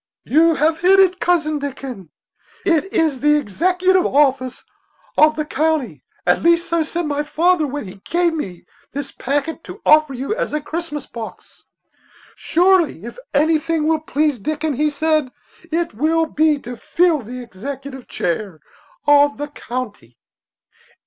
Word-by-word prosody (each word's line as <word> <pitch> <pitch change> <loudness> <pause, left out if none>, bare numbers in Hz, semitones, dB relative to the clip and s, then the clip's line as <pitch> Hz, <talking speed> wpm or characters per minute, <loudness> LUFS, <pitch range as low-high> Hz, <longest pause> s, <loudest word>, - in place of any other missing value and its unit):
"You 325 +3 +4
have 315 +2 +1
hit 380 +2 +5
it, 375 -1 +4
Cousin 315 -4 +1
Dickon; 265 - -7 0.6
it 350 +1 +1
is 310 -5 +1
the 295 +2 +4
executive 360 - +2
office 265 -3 +1 0.5
of 305 0 +5
the 305 - -2
county; 310 -2 -1 0.2
at - - +3
least 340 0 +3
so 335 -1 +1
said 340 +2 -2
my 295 -1 -1
father 320 +2 +2
when 285 -4 -5
he 190 +1 -12
gave 345 -1 +1
me 190 - -6 0.3
this 280 -1 -4
packet 285 +4 -3
to - - -9
offer 305 -3 +5
you 270 +10 -2
as - - -3
a 300 - 0
Christmas 305 -1 -5
box. 230 -2 -10 0.7
Surely, 345 - +2
if 240 +1 -9
anything 310 +1 +1
will 320 -1 +2
please 300 -3 0
Dickon,' 305 +7 -2
he 300 +4 +1
said, 305 -2 0 0.4
'it 335 -2 -1
will 320 +8 +1
be 310 -1 +2
to 245 +1 -7
fill 335 +6 +1
the 245 +1 -8
executive 265 +5 -8
chair 175 -1 -3 0.5
of 290 0 +5
the 290 +1 -5
county.'" 220 - -7
300 Hz, 150 wpm, -19 LUFS, 265-325 Hz, 0.7 s, hit